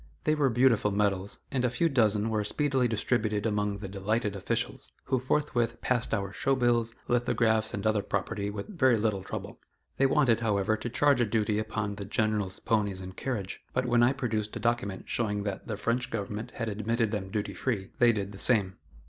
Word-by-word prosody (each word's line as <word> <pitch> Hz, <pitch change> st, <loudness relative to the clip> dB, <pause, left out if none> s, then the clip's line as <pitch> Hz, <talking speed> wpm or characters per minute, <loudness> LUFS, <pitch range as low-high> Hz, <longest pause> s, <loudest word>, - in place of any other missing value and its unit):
They 155 Hz, -, +3 dB
were 145 Hz, -3 st, +2 dB
beautiful 120 Hz, -3 st, +3 dB
medals, 100 Hz, -1 st, 0 dB
and 130 Hz, -2 st, 0 dB
a 125 Hz, -, +3 dB
few 165 Hz, +8 st, +1 dB
dozen 110 Hz, -6 st, +2 dB
were 105 Hz, -1 st, +1 dB
speedily 130 Hz, +3 st, +1 dB
distributed 110 Hz, -2 st, 0 dB
among 105 Hz, -2 st, 0 dB
the 100 Hz, -1 st, -6 dB
delighted 100 Hz, +2 st, -1 dB
officials, 95 Hz, -, -2 dB
who 130 Hz, -1 st, 0 dB
forthwith 120 Hz, -3 st, 0 dB
passed 125 Hz, -2 st, 0 dB
our 100 Hz, -3 st, -1 dB
show 135 Hz, +5 st, +1 dB
bills, 120 Hz, -2 st, +1 dB
lithographs 115 Hz, -2 st, +2 dB
and 100 Hz, +1 st, -4 dB
other 110 Hz, -1 st, +3 dB
property 100 Hz, +1 st, -2 dB
with 100 Hz, -1 st, -5 dB
very 130 Hz, -7 st, +4 dB
little 105 Hz, -2 st, 0 dB
trouble. 95 Hz, -, -7 dB, 0.4 s
They 135 Hz, -, +4 dB
wanted, 130 Hz, -6 st, +3 dB
however, 105 Hz, -2 st, +1 dB
to 110 Hz, +2 st, -5 dB
charge 140 Hz, +2 st, +3 dB
a -, -, +4 dB
duty 105 Hz, 0 st, +1 dB
upon 105 Hz, -2 st, -3 dB
the 100 Hz, -, -5 dB
General's 105 Hz, -2 st, -1 dB
ponies 105 Hz, -5 st, 0 dB
and 95 Hz, 0 st, -8 dB
carriage, 110 Hz, -8 st, -4 dB
but 130 Hz, 0 st, +1 dB
when 120 Hz, -1 st, +3 dB
I 120 Hz, +2 st, +5 dB
produced 110 Hz, -6 st, -2 dB
a -, -, -3 dB
document 115 Hz, -4 st, -1 dB
showing 105 Hz, -3 st, -1 dB
that 100 Hz, -2 st, -4 dB
the 105 Hz, -, -3 dB
French 120 Hz, +3 st, 0 dB
government 110 Hz, +1 st, -4 dB
had 115 Hz, -, -3 dB
admitted 110 Hz, +1 st, 0 dB
them 100 Hz, -3 st, -3 dB
duty 105 Hz, +1 st, -2 dB
free, 100 Hz, -7 st, -2 dB
they 120 Hz, -1 st, +6 dB
did 100 Hz, -3 st, -3 dB
the 100 Hz, -, -10 dB
same. 100 Hz, -7 st, +2 dB
110 Hz, 195 wpm, -29 LUFS, 100-120 Hz, 0.4 s, they